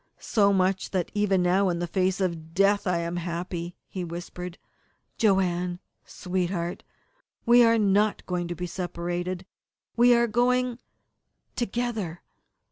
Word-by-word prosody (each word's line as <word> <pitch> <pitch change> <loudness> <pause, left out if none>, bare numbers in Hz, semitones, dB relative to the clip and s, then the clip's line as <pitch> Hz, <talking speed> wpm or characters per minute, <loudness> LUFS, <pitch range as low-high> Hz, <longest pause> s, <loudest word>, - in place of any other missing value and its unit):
"So 200 -2 +2
much 190 0 +1
that 185 -3 -2
even 200 -3 +2
now, 185 +2 +3
in 175 - -1
the 175 - -2
face 185 +2 0
of 165 -4 -3
death, 200 +1 +3
I 180 -1 +2
am 170 +1 -2
happy," 175 0 -4
he 185 - -5
whispered. 175 +1 -7 0.6
"Joanne, 180 -4 +2 0.3
sweetheart, 180 -1 -3 0.6
we 240 0 +7
are 230 0 +5
not 205 0 +2
going 180 -1 -2
to 175 - -4
be 180 - -4
separated. 175 +1 -4 0.5
We 240 +1 +6
are 235 0 +4
going 245 +1 +1 0.8
together. 230 -7 -3
185 Hz, 130 wpm, -26 LUFS, 175-205 Hz, 0.8 s, we